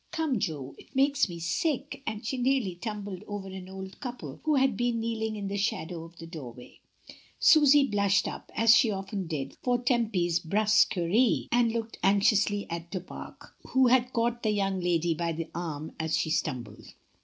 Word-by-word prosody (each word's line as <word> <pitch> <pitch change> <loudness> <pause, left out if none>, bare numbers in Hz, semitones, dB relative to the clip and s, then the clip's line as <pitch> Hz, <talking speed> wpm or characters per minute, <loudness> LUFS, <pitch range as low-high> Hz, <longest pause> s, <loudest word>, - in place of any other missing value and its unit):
"Come, 320 -8 -1
Jo, 145 -7 -3
it - - -18
makes 275 -3 +3
me 170 - -6
sick," 275 - -2
and 220 +1 -4
she 265 - -1
nearly 250 -6 +1
tumbled 205 0 -6
over 205 -2 -5
an 190 -1 -8
old 190 0 -8
couple 250 -2 -7
who 305 -1 +3
had 265 -4 +3
been 240 +1 0
kneeling 220 -1 -2
in 205 -2 -4
the 200 +1 -2
shadow 180 -5 -2
of 165 +1 -13
the 165 - -10
door 155 -8 -8
way. 125 0 -14 0.6
Susy 295 -3 +6
blushed 200 -2 +2
up, - - -7
as 230 +1 +6
she 230 - +4
often 195 -2 -4
did, 140 -4 -4
for 245 -1 +2
Tempy's 220 -9 +1
hrusquerity 210 +3 +2
and 240 -1 +3
looked 230 0 -4
anxiously 205 +1 +3
at 170 0 -6
Du 185 - -3
Pare, 180 - -10 0.2
who 260 0 +2
had 250 0 +3
caught 240 0 0
the 220 - 0
young 195 -2 0
lady 175 -1 +1
by 165 +1 -2
the 165 0 -5
arm 160 -3 -5
as 160 0 0
she 160 - -1
stumbled. 120 -8 -3
205 Hz, 185 wpm, -28 LUFS, 175-240 Hz, 0.6 s, Susy